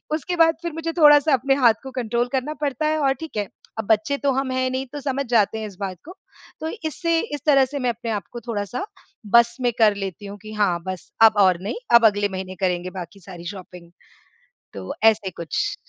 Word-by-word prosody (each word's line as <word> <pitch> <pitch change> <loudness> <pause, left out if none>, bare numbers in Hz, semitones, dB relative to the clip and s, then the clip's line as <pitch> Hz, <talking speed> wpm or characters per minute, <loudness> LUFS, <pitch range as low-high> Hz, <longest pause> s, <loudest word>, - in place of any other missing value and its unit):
उसके 340 +4 -3
बाद 325 0 +5
फिर 340 -1 -4
मुझे 325 +1 -3
थोड़ा-सा 295 -1 +6
अपने 270 +1 +2
हाथ 240 -5 +5
को 265 - -8
कंट्रोल 240 -1 -1
करना 265 +3 -1
पड़ता 290 +1 -1
है 310 0 +1
और 275 -2 +2
ठीक 320 -9 -7
है। 205 -2 -1 0.3
अब 220 - -2
बच्चे 220 +6 +2
तो 280 -1 +1
हम 270 0 -1
हैं 255 0 0
नहीं 260 +1 -2
तो 290 - -4
समझ 275 0 -2
जाते 220 -2 +2
हैं 215 - -4
इस 200 - -12
बात 190 -3 -4
को। 355 - -11 0.4
तो 315 - -4 0.2
इससे 330 +2 0 0.2
इस 285 - -8
तरह 275 -3 +5
से 285 +2 -5
मैं 250 -2 0
अपने 230 0 -4
आप 205 -4 -2
को 240 - -7
थोड़ा-सा 230 - -4 0.5
बस 235 0 +5
में 245 -1 +2
कर 215 -2 +5
लेती 195 0 -6
हूँ। 200 +1 -8
कि 215 0 -9
हाँ, 200 -5 +1
बस 185 -2 -6
अब 220 -2 +6
और 185 -3 +4
नहीं। 205 - -3 0.2
अब 235 -1 +7
अगले 205 -1 +3
महीने 185 0 -6
करेंगे 180 -1 -1
बाकी 180 +3 -9
सारी 175 -2 -11
शॉपिंग। 180 -3 -10 0.8
तो 95 -1 -6
ऐसे 220 -3 +4
कुछ। 170 -3 -2
235 Hz, 225 wpm, -22 LUFS, 200-275 Hz, 0.8 s, अब